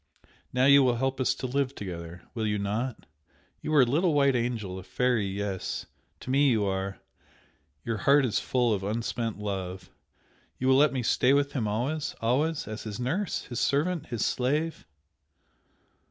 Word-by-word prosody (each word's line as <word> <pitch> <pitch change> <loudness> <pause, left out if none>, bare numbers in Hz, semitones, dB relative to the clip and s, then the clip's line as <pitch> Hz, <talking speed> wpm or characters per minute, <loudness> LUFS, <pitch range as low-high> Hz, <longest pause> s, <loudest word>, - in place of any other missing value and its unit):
now 125 +1 +2
you 140 0 +8
will 125 -2 +3
help 135 +2 -1
us 130 - +2
to - - -5
live 135 +1 -1
together! 85 -2 -7
Will 110 -3 -1
you 105 0 0
not? 110 +5 -3 0.6
You 155 - -4
are 140 - +7
a - - +3
little 155 +6 +2
white 140 -2 +4
angel 115 -6 -2
a - - -10
fairy! 115 +2 0
yes! 100 -1 -3 0.4
to 130 - -5
me 140 +1 +4
you 110 -4 +2
are! 95 0 -2 0.9
your 115 -1 -1
heart 140 +5 +4
is 115 - +1
full 120 -3 +1
of 100 - -1
unspent 115 +1 -2
love! 95 -3 -5 0.7
You 130 - 0
will 130 - +6
let 150 0 +5
me 130 -2 -2
stay 125 +3 +3
with 140 0 +2
him 120 -6 -1
always 130 +9 -2
always? 145 +7 0
As 110 0 -5
his 110 0 -6
nurse? 160 +12 -1
his 120 - -5
servant? 155 +4 0
his 120 -4 -1
slave?" 150 +6 -1
125 Hz, 175 wpm, -28 LUFS, 105-140 Hz, 0.9 s, you